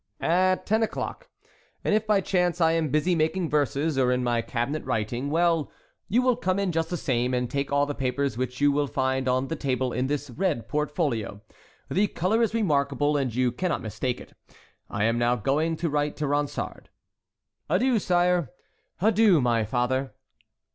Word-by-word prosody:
"At 185 Hz, +2 st, +2 dB
ten 220 Hz, +2 st, +2 dB
o'clock; -, -, -3 dB, 0.5 s
and -, -, +1 dB
if 215 Hz, +1 st, +1 dB
by 210 Hz, -2 st, +3 dB
chance 180 Hz, -2 st, 0 dB
I 165 Hz, -1 st, +4 dB
am 165 Hz, -2 st, 0 dB
busy 155 Hz, +6 st, +1 dB
making 165 Hz, +1 st, 0 dB
verses, 145 Hz, 0 st, +1 dB
or 125 Hz, -1 st, +3 dB
in 125 Hz, 0 st, 0 dB
my 120 Hz, -1 st, +1 dB
cabinet 120 Hz, +6 st, -3 dB
writing, 120 Hz, +2 st, -2 dB
well—you 170 Hz, -, -1 dB
will 250 Hz, -1 st, +3 dB
come 185 Hz, -6 st, -1 dB
in 200 Hz, -2 st, 0 dB
just 165 Hz, 0 st, -1 dB
the 175 Hz, -, -2 dB
same, 125 Hz, -3 st, 0 dB
and 125 Hz, 0 st, 0 dB
take 140 Hz, +3 st, -3 dB
all 140 Hz, 0 st, +3 dB
the 145 Hz, -, -3 dB
papers 135 Hz, -1 st, -1 dB
which 125 Hz, +1 st, -3 dB
you 145 Hz, 0 st, +4 dB
will 145 Hz, 0 st, +1 dB
find 130 Hz, -1 st, -1 dB
on 130 Hz, +1 st, +1 dB
the 165 Hz, -, -3 dB
table 130 Hz, -3 st, -1 dB
in 125 Hz, +1 st, 0 dB
this 145 Hz, -1 st, -3 dB
red 120 Hz, -, -1 dB
portfolio. 145 Hz, -, -2 dB, 0.5 s
The 205 Hz, +3 st, +2 dB
color 195 Hz, +6 st, 0 dB
is 230 Hz, -1 st, +1 dB
remarkable, 145 Hz, -, +1 dB
and 135 Hz, -4 st, 0 dB
you 125 Hz, -1 st, +2 dB
cannot 180 Hz, +8 st, -2 dB
mistake 120 Hz, +3 st, -3 dB
it. -, -, -13 dB, 0.6 s
I 100 Hz, -, -2 dB
am 115 Hz, +1 st, +2 dB
now 120 Hz, +1 st, +2 dB
going 150 Hz, +8 st, 0 dB
to 170 Hz, -, -1 dB
write 145 Hz, -1 st, -1 dB
to 150 Hz, 0 st, -2 dB
Ronsard." 145 Hz, 0 st, -2 dB, 0.8 s
"Adieu, 255 Hz, -3 st, +2 dB
sire!" 175 Hz, -4 st, +2 dB, 0.5 s
"Adieu, 210 Hz, -4 st, +5 dB
my 120 Hz, -3 st, +2 dB
father!" 130 Hz, +4 st, -1 dB
145 Hz, 180 wpm, -26 LUFS, 125-175 Hz, 0.8 s, Adieu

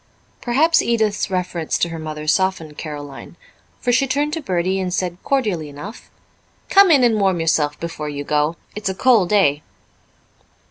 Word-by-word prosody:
Perhaps 310 Hz, +7 st, +3 dB
Edith's 220 Hz, -3 st, 0 dB
reference 180 Hz, -3 st, -2 dB
to 170 Hz, -, 0 dB
her 165 Hz, -1 st, -6 dB
mother 155 Hz, -1 st, -6 dB
softened 165 Hz, -2 st, 0 dB
Caroline, 145 Hz, -3 st, -8 dB, 0.4 s
for 245 Hz, -, 0 dB
she 270 Hz, +3 st, +2 dB
turned 290 Hz, +3 st, -1 dB
to 325 Hz, -, -2 dB
Bertie 185 Hz, -, -1 dB
and 185 Hz, -1 st, -2 dB
said 180 Hz, -1 st, -2 dB
cordially 210 Hz, -, -1 dB
enough, 150 Hz, +11 st, -10 dB, 0.6 s
"Come 395 Hz, -1 st, +7 dB
in, 285 Hz, -6 st, +5 dB
and 225 Hz, -3 st, +3 dB
warm 190 Hz, -3 st, +2 dB
yourself 155 Hz, -2 st, 0 dB
before 165 Hz, -3 st, -5 dB
you 145 Hz, -1 st, -5 dB
go. 150 Hz, +2 st, 0 dB, 0.2 s
It's 210 Hz, -2 st, -3 dB
a 190 Hz, -, -3 dB
cold 220 Hz, -6 st, +3 dB
day." 155 Hz, -9 st, +3 dB
185 Hz, 160 wpm, -20 LUFS, 155-235 Hz, 0.6 s, Come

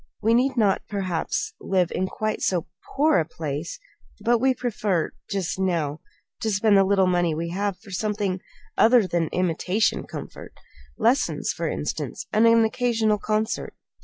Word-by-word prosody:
"We 225 Hz, +2 st, +2 dB
need 260 Hz, +2 st, +2 dB
not, 205 Hz, -4 st, +3 dB
perhaps, 200 Hz, -, -2 dB
live 185 Hz, -3 st, +1 dB
in 185 Hz, -, -1 dB
quite 215 Hz, +2 st, -3 dB
so 180 Hz, -4 st, 0 dB, 0.3 s
poor 295 Hz, -, +4 dB
a -, -, +2 dB
place; 155 Hz, 0 st, -5 dB, 0.4 s
but 240 Hz, 0 st, +2 dB
we 260 Hz, +1 st, +2 dB
prefer 210 Hz, -8 st, -1 dB, 0.2 s
just 190 Hz, -2 st, -2 dB
now 165 Hz, -6 st, 0 dB, 0.4 s
to 220 Hz, -, 0 dB
spend 205 Hz, +1 st, +3 dB
the 195 Hz, -, +6 dB
little 195 Hz, 0 st, +3 dB
money 175 Hz, -3 st, +1 dB
we 165 Hz, +2 st, -3 dB
have 200 Hz, +1 st, -2 dB
for 200 Hz, -, -15 dB
something 200 Hz, -1 st, -1 dB, 0.3 s
other 230 Hz, -1 st, +5 dB
than 170 Hz, -2 st, 0 dB
imitation 180 Hz, +5 st, 0 dB
comfort -, -, -9 dB, 0.4 s
lessons, 240 Hz, +5 st, +1 dB
for -, -, -2 dB
instance, -, -, -4 dB
and 220 Hz, +2 st, +5 dB
an 230 Hz, 0 st, +5 dB
occasional 220 Hz, -2 st, +1 dB
concert. 215 Hz, +2 st, -2 dB
200 Hz, 155 wpm, -24 LUFS, 180-225 Hz, 0.4 s, the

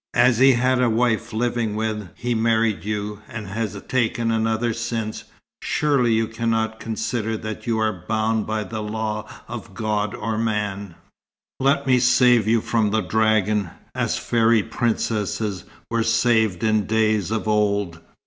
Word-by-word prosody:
As 120 Hz, -1 st, +4 dB
he 135 Hz, 0 st, +7 dB
had 125 Hz, +1 st, +2 dB
a 125 Hz, -, +3 dB
wife 115 Hz, 0 st, +1 dB
living 115 Hz, -1 st, -1 dB
when 110 Hz, -3 st, -3 dB
he 120 Hz, 0 st, -2 dB
married 115 Hz, -2 st, +1 dB
you, 105 Hz, 0 st, -4 dB
and 110 Hz, -2 st, -6 dB
has 105 Hz, 0 st, -4 dB
taken 115 Hz, -2 st, 0 dB
another 115 Hz, +1 st, 0 dB
since, 115 Hz, -2 st, -4 dB, 0.4 s
surely 140 Hz, -6 st, +1 dB
you 110 Hz, 0 st, +2 dB
cannot 110 Hz, 0 st, -1 dB
consider 110 Hz, 0 st, -2 dB
that 110 Hz, +2 st, -7 dB
you 115 Hz, -1 st, +1 dB
are 110 Hz, -5 st, -1 dB
bound 110 Hz, 0 st, 0 dB
by 110 Hz, 0 st, -1 dB
the 110 Hz, +2 st, -5 dB
law 110 Hz, 0 st, -3 dB, 0.2 s
of 110 Hz, -4 st, -8 dB
God 105 Hz, -1 st, -1 dB
or 110 Hz, 0 st, -3 dB
man? 105 Hz, -4 st, -2 dB, 0.6 s
Let 140 Hz, +1 st, +2 dB
me 130 Hz, -2 st, +4 dB
save 125 Hz, -3 st, +4 dB
you 115 Hz, 0 st, +3 dB
from 110 Hz, -2 st, +1 dB
the 110 Hz, +1 st, +1 dB
dragon, 105 Hz, -1 st, +1 dB, 0.2 s
as -, -, -1 dB
fairy 115 Hz, -2 st, +2 dB
princesses 110 Hz, -4 st, -2 dB, 0.3 s
were 115 Hz, 0 st, +1 dB
saved 115 Hz, -4 st, +2 dB
in 110 Hz, -2 st, +2 dB
days 110 Hz, -3 st, +1 dB
of 110 Hz, 0 st, -2 dB
old. 100 Hz, -5 st, +1 dB
110 Hz, 150 wpm, -22 LUFS, 105-115 Hz, 0.6 s, he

